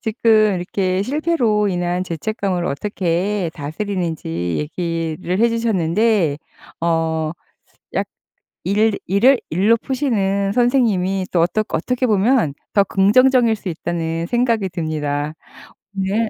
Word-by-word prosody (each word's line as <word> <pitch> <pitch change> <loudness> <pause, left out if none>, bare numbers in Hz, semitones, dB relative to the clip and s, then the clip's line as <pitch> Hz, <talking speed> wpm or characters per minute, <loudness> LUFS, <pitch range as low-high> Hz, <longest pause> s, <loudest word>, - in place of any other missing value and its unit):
지금 215 -2 +3
이렇게 185 +1 -1
실패로 250 -7 +1
인한 175 0 -1
죄책감을 180 +1 -2
어떻게 180 +2 -1
다스리는지 165 - -4 0.3
얘기를 165 +2 -3
해 235 +2 +4
주셨는데 210 -6 +1 0.4
어 160 -1 0 0.6
약 - - 0 0.6
일 210 +2 +2
일을 235 +8 +4
일로 200 +8 +3
푸시는 200 -7 -1
선생님이 215 -7 +2
또 170 - +3
어떻 215 +5 +1
어떻게 250 +10 -1
보면 210 - +2 0.2
'더 200 - +5
긍정적일 230 +4 +4
수 200 - -9
있다.'는 165 0 -3
생각이 230 -5 +1
듭니다. 155 -3 -2 0.6
오늘 200 +4 0
195 Hz, 255 characters per minute, -19 LUFS, 170-220 Hz, 0.6 s, 더